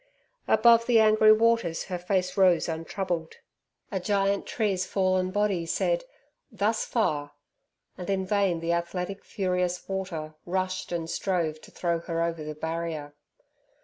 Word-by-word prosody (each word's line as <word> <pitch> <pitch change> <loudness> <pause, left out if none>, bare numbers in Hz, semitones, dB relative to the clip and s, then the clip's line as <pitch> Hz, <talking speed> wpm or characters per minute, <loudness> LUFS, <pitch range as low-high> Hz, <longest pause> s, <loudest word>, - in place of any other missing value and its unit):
Above 230 0 +5
the 235 -2 +5
angry 215 0 +6
waters 225 -6 +3
her 180 -1 -4
face 185 0 -1
rose 185 -4 +4
untroubled. 165 0 -3 0.6
A 190 - -1
giant 200 0 0
tree's 200 -5 0
fallen 185 -1 +1
body 200 -3 0
said, - - 0 0.5
"Thus 220 +1 0
far!" 150 -11 -1 0.7
and 180 - -6
in 190 -1 0
vain 190 -4 +1
the 170 +1 0
athletic 180 +3 -3
furious 180 -3 -2
water 185 -5 -4
rushed 185 +1 -2
and 170 -2 -2
strove 165 -4 -1
to - - -14
throw 170 -1 -1
her 165 0 -2
over 165 -2 -2
the 150 0 -6
barrier. 160 -2 -4
185 Hz, 140 wpm, -27 LUFS, 170-200 Hz, 0.7 s, angry